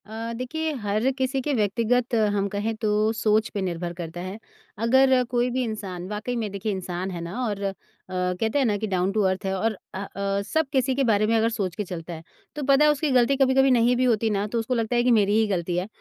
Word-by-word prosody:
अ, 225 Hz, +2 st, -5 dB
देखिए 310 Hz, +7 st, -3 dB
हर 210 Hz, +5 st, +1 dB
किसी 265 Hz, 0 st, 0 dB
के 290 Hz, +2 st, -1 dB
व्यक्तिगत 235 Hz, +2 st, +1 dB, 0.2 s
हम 200 Hz, 0 st, +1 dB
कहें 210 Hz, +3 st, -2 dB
तो 215 Hz, 0 st, -2 dB, 0.2 s
सोच 215 Hz, 0 st, +1 dB
पे 205 Hz, -, -2 dB
निर्भर 175 Hz, -2 st, -3 dB
करता 175 Hz, 0 st, -7 dB
है। 185 Hz, +3 st, -6 dB, 0.5 s
अगर 260 Hz, +1 st, +5 dB
कोई 245 Hz, 0 st, +1 dB
भी 255 Hz, +1 st, 0 dB
इंसान 195 Hz, -6 st, -5 dB
वाक़ई 210 Hz, +4 st, -3 dB
में 225 Hz, -3 st, -2 dB
देखिए 200 Hz, +2 st, -3 dB
इंसान 185 Hz, -1 st, -4 dB
है 175 Hz, -2 st, -5 dB
ना 175 Hz, +9 st, -5 dB
और 205 Hz, -3 st, -3 dB
अ, 195 Hz, -1 st, -1 dB, 0.7 s
कहते 225 Hz, +5 st, +1 dB
हैं 270 Hz, -, +2 dB
ना 210 Hz, -3 st, +2 dB
कि 220 Hz, +1 st, -3 dB
डाउन 185 Hz, -1 st, 0 dB
टू 215 Hz, +1 st, +1 dB
अर्थ 190 Hz, +2 st, -4 dB
है 190 Hz, -, 0 dB
और 220 Hz, +4 st, 0 dB, 0.2 s
अ -, -, -5 dB
अ, 200 Hz, 0 st, -2 dB
सब 315 Hz, +9 st, 0 dB
किसी 265 Hz, -1 st, +2 dB
के 275 Hz, -, +1 dB
बारे 215 Hz, -3 st, +2 dB
में 230 Hz, -, +2 dB
अगर 225 Hz, +1 st, +2 dB
सोच 200 Hz, -6 st, -3 dB
के 210 Hz, -, -2 dB
चलता 175 Hz, -2 st, -7 dB
है 160 Hz, 0 st, -9 dB, 0.3 s
तो 295 Hz, -, -4 dB
पता 275 Hz, +2 st, +5 dB
है 300 Hz, -, +6 dB
उसकी 295 Hz, 0 st, -1 dB
ग़लती 255 Hz, +1 st, +4 dB
कभी-कभी 270 Hz, 0 st, +4 dB
नहीं 245 Hz, 0 st, +4 dB
भी 250 Hz, -, +1 dB
होती 225 Hz, -3 st, +2 dB
ना 205 Hz, -1 st, 0 dB
तो 230 Hz, +2 st, -2 dB
उसको 225 Hz, +3 st, -2 dB
लगता 230 Hz, +1 st, -1 dB
है 240 Hz, -, +3 dB
कि 250 Hz, -, +3 dB
मेरी 205 Hz, +1 st, +2 dB
ही 220 Hz, -, +3 dB
ग़लती 175 Hz, -3 st, -1 dB
है 180 Hz, +2 st, -1 dB
220 Hz, 245 wpm, -25 LUFS, 195-250 Hz, 0.7 s, है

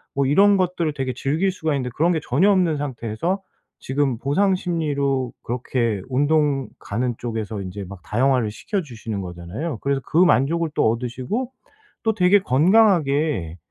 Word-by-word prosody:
뭐 140 Hz, 0 st, +2 dB
이런 200 Hz, +9 st, +5 dB
것들을 175 Hz, -4 st, 0 dB
되게 135 Hz, -2 st, -2 dB
즐길 160 Hz, +10 st, 0 dB
수가 160 Hz, -4 st, -2 dB
있는데 130 Hz, -2 st, -2 dB
그런 170 Hz, +3 st, +2 dB
게 160 Hz, -, 0 dB
전혀 155 Hz, +12 st, +3 dB
없는 180 Hz, -5 st, +2 dB
상태에서 140 Hz, -, -3 dB, 0.4 s
지금 135 Hz, -2 st, 0 dB
보상 185 Hz, -, +2 dB
심리로 140 Hz, -8 st, -1 dB
그렇게 120 Hz, -3 st, -1 dB
운동 145 Hz, 0 st, +1 dB
가는 120 Hz, +4 st, -2 dB
쪽에서 110 Hz, -3 st, -4 dB
이제 95 Hz, +1 st, -6 dB
막 95 Hz, -1 st, -10 dB
다양화를 125 Hz, -1 st, +1 dB
시켜 195 Hz, -, -3 dB
주시는 115 Hz, -, -6 dB
거잖아요. 90 Hz, -, -5 dB
그래서 140 Hz, 0 st, 0 dB
그 -, -, -2 dB
만족을 170 Hz, -1 st, +3 dB
또 -, -, +3 dB
얻으시고 125 Hz, -, -3 dB, 0.5 s
또 220 Hz, -1 st, +2 dB
되게 185 Hz, +1 st, +5 dB
건강하게 150 Hz, -, +2 dB
140 Hz, 340 characters per minute, -22 LUFS, 120-170 Hz, 0.5 s, 이런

